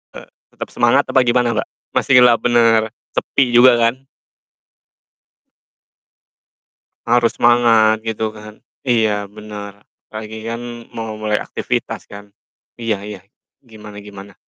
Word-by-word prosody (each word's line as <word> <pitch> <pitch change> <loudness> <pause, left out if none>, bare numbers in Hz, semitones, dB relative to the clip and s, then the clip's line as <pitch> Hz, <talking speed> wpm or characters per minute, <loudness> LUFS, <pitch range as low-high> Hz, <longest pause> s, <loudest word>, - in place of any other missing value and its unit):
Eee, - - -10 0.3
tetap - - -7
semangat - - +3
apa 130 - +4
gimana, 120 -1 +1
Mbak? 110 - -2 0.3
Masihlah, 125 -3 +5
bener, 115 -2 +3 0.2
sepi 130 -3 0
juga 120 0 +6
kan? 120 +3 -1 3.0
Harus 120 0 +2
semangat 115 -2 +4
gitu 110 -1 -3
kan. 105 0 -12 0.3
Iya, 115 -3 +2 0.2
bener 105 -1 -10 0.2
apa 110 0 -7
lagi 110 +1 -9
kan 115 +1 -5 0.4
mau 110 -1 -4
mulai 105 -1 0
aktivitas - - -4
kan. 100 0 -10 0.6
Iya 115 -2 0
iya, 105 -2 -8 0.4
gimana 105 -3 -13
gimana? 100 -1 -12
115 Hz, 115 wpm, -18 LUFS, 105-120 Hz, 3.0 s, juga